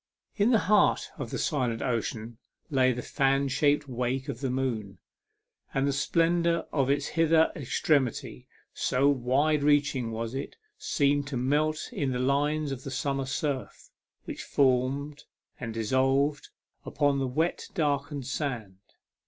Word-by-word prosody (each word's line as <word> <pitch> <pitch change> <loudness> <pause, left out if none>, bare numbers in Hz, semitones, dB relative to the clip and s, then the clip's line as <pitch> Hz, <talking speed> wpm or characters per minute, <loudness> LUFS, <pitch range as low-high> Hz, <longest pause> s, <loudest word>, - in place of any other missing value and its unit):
In 205 +2 +3
the 240 - +5
heart 210 +1 +3
of - - -4
the - - -3
silent 125 -8 -1
ocean 115 -1 -3 0.3
lay 130 -2 +4
the 125 0 -4
fan 135 0 +1
shaped 145 +2 +2
wake 130 +2 -2
of 130 -2 -5
the 135 - -1
moon, 115 -7 -2 0.8
and 135 0 +2
the 140 - +1
splendour 170 +3 +1
of 135 -3 +1
its 140 - +1
hither 165 0 +3
extremity, 135 - -1 0.3
so 130 +2 +1
wide 145 +3 +2
reaching 145 -4 +2
was 115 +1 -4
it, 135 +1 -5 0.2
seemed 145 - +1
to 140 -3 -3
melt 150 +5 0
in 135 -3 -1
the - - -1
lines 145 +3 +1
of 135 -2 -5
summer 135 0 -2
surf, 130 0 -4 0.3
which - - -6
formed 140 +2 0 0.3
and 115 -2 -5
dissolved 135 +5 +1 0.3
upon 145 -2 +1
the 135 - 0
wet 160 +7 -1
darkened 145 -4 -1
sand. 120 -9 -4
135 Hz, 140 wpm, -28 LUFS, 125-145 Hz, 0.8 s, the